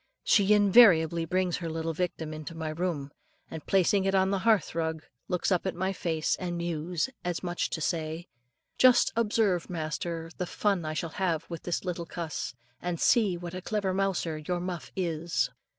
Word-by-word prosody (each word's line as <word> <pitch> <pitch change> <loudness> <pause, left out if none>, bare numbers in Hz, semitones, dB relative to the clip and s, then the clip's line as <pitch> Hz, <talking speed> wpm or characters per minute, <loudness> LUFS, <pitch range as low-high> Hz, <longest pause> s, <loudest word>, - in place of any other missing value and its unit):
She 205 0 +5
invariably 180 -6 +6
brings 180 +1 0
her 170 -2 -4
little 165 0 -2
victim 160 -2 -3
into 155 +1 -7
my 160 -1 -3
room, 155 -4 -3 0.4
and 160 -2 -6
placing 195 +1 +3
it 195 0 +2
on 190 0 +3
the 195 - +1
hearth 215 -5 +2
rug, 160 -1 -2 0.2
looks 180 +2 0
up 180 +1 +1
in 185 - -3
my 190 +1 0
face, 160 -4 0
and 175 -2 -3
mews, 170 +1 -2 0.2
as 175 0 -3
much 175 -1 -1
as - - -2
to 160 - -4
say, 160 +2 -2 0.5
"Just 255 -1 +6
observe, 210 -5 +1
master, 165 0 -4
the 180 - -2
fun 195 -5 0
I 155 0 -3
shall 165 +1 -3
have 170 -4 0
with 170 - -5
this 175 +1 -3
little 175 -2 -3
cuss; 160 -7 -4 0.3
and 175 -2 -3
see 205 -7 +3
what 175 0 -7
a 185 - -5
clever 200 -1 -1
mouser 185 -5 -1
your 175 +4 -2
Muff 175 -2 -5
is." 170 -2 -1
175 Hz, 185 wpm, -29 LUFS, 160-190 Hz, 0.5 s, invariably